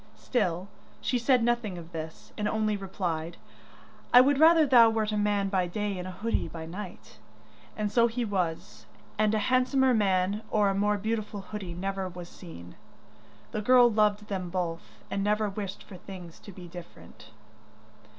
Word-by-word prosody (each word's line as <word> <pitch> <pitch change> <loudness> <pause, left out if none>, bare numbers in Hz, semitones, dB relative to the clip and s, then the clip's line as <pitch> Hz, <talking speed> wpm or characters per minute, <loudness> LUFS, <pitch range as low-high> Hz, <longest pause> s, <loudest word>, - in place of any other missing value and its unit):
Still 185 -6 -1 0.3
she 250 - 0
said 250 0 +3
nothing 235 -5 0
of 170 0 -10
this, 160 -1 -8
and 210 - -2
only 215 -1 0
replied, 175 -4 -4 0.7
'I 245 - +9
would 275 +1 +3
rather 320 0 +7
thou 240 -4 +7
wert 220 -1 0
a - - -1
man 205 -1 +1
by 190 -2 0
day 205 +1 -3
and 180 - -5
a - - -5
hoodie 220 +5 -2
by 165 -1 -7
night,' 185 +3 -9 0.6
And 210 -1 -1
so 235 +1 +4
he 235 +1 -2
was; 180 -6 -3 0.3
and 215 0 +3
a 215 +2 0
handsomer 260 +1 +3
man 200 -1 +1
or 210 -2 +3
a - - +1
more 205 +1 +1
beautiful 210 -1 -3
hoodie 195 -3 -7
never 195 +1 -3
was 175 -1 -9
seen. 90 - -11 0.8
The 215 - -2
girl 245 +1 +6
loved 210 -1 +2
them 185 -3 -3
both, 170 -2 -4
and 195 0 -1
never 210 +1 +1
wished 195 -1 -6
for 185 - -11
things 180 -3 -10
to 200 - -11
be 180 -1 -11
different. 165 -10 -12
205 Hz, 170 wpm, -28 LUFS, 180-220 Hz, 0.8 s, I